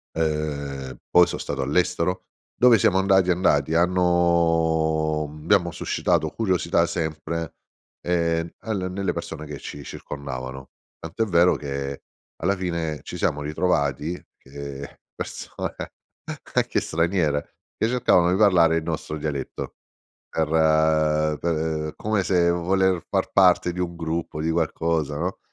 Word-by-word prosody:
Ehm, 70 -4 -2 0.2
poi, 90 0 +7
son - - -5
stato 70 -1 -3
all’estero 85 +5 0 0.3
dove 125 -2 +6
siamo 95 -1 +3
andati, 95 -1 +4
andati. 80 -5 +2
Hanno 85 -3 +2 0.2
abbiamo 85 +1 +2
suscitato 80 0 0
curiosità 90 -3 +1
sempre, 80 -1 -3 0.5
ehm, 85 -1 0
alle 100 -5 -3
nelle 95 0 -2
persone 75 - -6
che 75 -1 -7
ci 70 - -8
circondavano. 65 -3 -7 0.3
Tant’è 80 +8 -2
vero 90 -3 +4
che, 70 -1 -5 0.4
alla 100 - +1
fine, 85 -4 -2
ci - - -7
siamo 75 - 0
ritrovati 75 0 -1 0.2
che 70 0 -9 0.2
persone - - -6 0.8
anche - - +2
straniere, 85 -3 0 0.2
che 110 - +1
cercavano 115 -8 +3
di 90 - +2
parlare 90 -6 +5
il 80 - -2
nostro 80 -1 -4
dialetto. 70 -3 -4 0.5
Per 80 -1 +2
per, 80 -2 -1
come 105 -2 0
se 85 -2 +3
voler 95 +1 +1
far - - 0
parte 90 -2 +4
di 90 - -5
un 85 -1 -2
gruppo, 80 -1 -3
di 80 - 0
qualcosa, 80 -2 0
no, 90 +5 -3
80 Hz, 125 wpm, -24 LUFS, 75-90 Hz, 0.8 s, poi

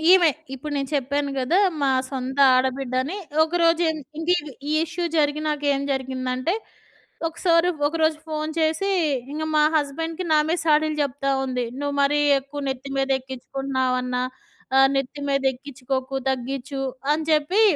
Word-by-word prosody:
ఈమె. 360 -3 +7 0.2
ఇప్పుడు 290 +3 -6
నేను 275 -1 -2
చెప్పాను 280 +1 0
కదా! 265 +9 +2 0.2
మా 275 - +3 0.2
సొంత 265 0 -4 0.2
ఆడబిడ్డ 260 0 0
అని. 310 +9 -4 0.3
ఒకరోజు 335 +1 +2
ఎన్ 315 -1 -4 0.2
ఇంకిది, 325 -3 0 0.2
ఈ - - +1
ఇష్యూ 340 +2 -4
జరిగినా‌క 300 0 0
ఏం 275 - -2
జరిగిందంటే, 260 +3 -2 0.7
ఒకసారి 335 +1 +2 0.2
ఒకరోజు 315 0 +1
ఫోన్ 310 0 -2
చేసి, 320 +5 +1 0.4
ఇంక 310 +1 -3
మా 300 - +5
హస్బెండ్‌కి 325 +4 -2
నా 305 - +6
మీద 340 - +1
సాడీలు 310 0 +3
చెప్తా 275 0 -1
ఉంది. 250 -2 -2 0.2
"నువ్వు 285 0 -2
మరీ 295 +1 +3 0.2
ఎక్కువ 280 +1 -7
నెత్తి 265 +1 -4
మీద 270 0 0
ఎక్కించుకుంటున్నావన్నా. 260 -1 -2 0.5
ఆహ్, 270 0 +7
నెత్తి 275 +2 -3
మీదెక్కించుకోకు. 265 -1 -2 0.2
తగ్గీచు." 270 +2 -3 0.3
అని 315 +1 -1
చెప్పి 310 +8 +3
285 Hz, 140 wpm, -23 LUFS, 265-315 Hz, 0.7 s, ఈమె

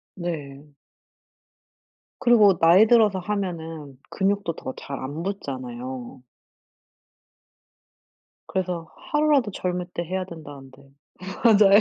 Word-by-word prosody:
네. 150 -5 -6 1.5
그리고 210 -7 +5
나이 180 +6 +6
들어서 215 -5 +4
하면은 165 -8 -4
근육도 195 -3 0
더 130 - -6
잘 140 -1 -7
안 145 +5 -5
붙잖아요. 130 -8 -6 2.2
그래서 180 -3 -3 0.2
하루라도 295 -7 +3
젊을 180 -1 -3
때 170 - -2
해야 185 +2 -3
된다는데. 140 -5 -11 0.6
맞아요. 205 -3 +7
175 Hz, 210 characters per minute, -24 LUFS, 140-200 Hz, 2.2 s, 맞아요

